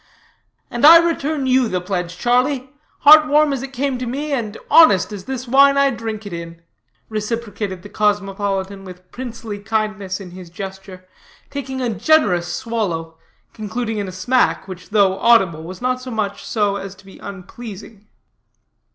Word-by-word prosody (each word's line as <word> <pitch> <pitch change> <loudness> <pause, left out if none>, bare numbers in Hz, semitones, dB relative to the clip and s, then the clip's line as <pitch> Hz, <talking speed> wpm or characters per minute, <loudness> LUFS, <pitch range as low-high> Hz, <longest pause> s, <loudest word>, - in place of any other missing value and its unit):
"And 240 - -4
I 325 +3 +11
return 315 -4 0
you 260 -1 +3
the 185 -4 -1
pledge, 180 -1 -4
Charlie, 255 +4 +1 0.3
heart 305 +1 +8
warm 300 0 +3
as 265 - -3
it 270 0 -7
came 270 -1 -2
to 250 - -4
me, 285 +5 -4
and 225 -6 -2
honest 215 - +6
as 195 -2 -8
this 260 -1 -5
wine 275 +3 +5
I 280 0 +4
drink 220 -2 -5
it 200 - -7
in," 170 0 -8 0.4
reciprocated 210 -3 -4
the 205 - -10
cosmopolitan 200 -2 -1
with 180 -1 -13
princely 230 -4 -7
kindliness 210 -2 -2
in 185 -3 -10
his 180 -1 -11
gesture, 190 0 -9 0.5
taking 265 -2 -5
a 245 - 0
generous 200 - +2
swallow, 175 -9 -3 0.3
concluding 220 +1 -4
in 200 - -3
a - - -6
smack, 245 +4 +1
which, 180 -1 -10
though 200 -2 +2
audible, 195 -9 +4
was 180 +7 -9
not 255 0 0
so 255 - -8
much 215 -4 -3
so 205 -3 0
as 195 0 -7
to 205 - -20
be 195 - -14
unpleasing. 200 +1 -10
215 Hz, 165 wpm, -19 LUFS, 190-255 Hz, 0.5 s, I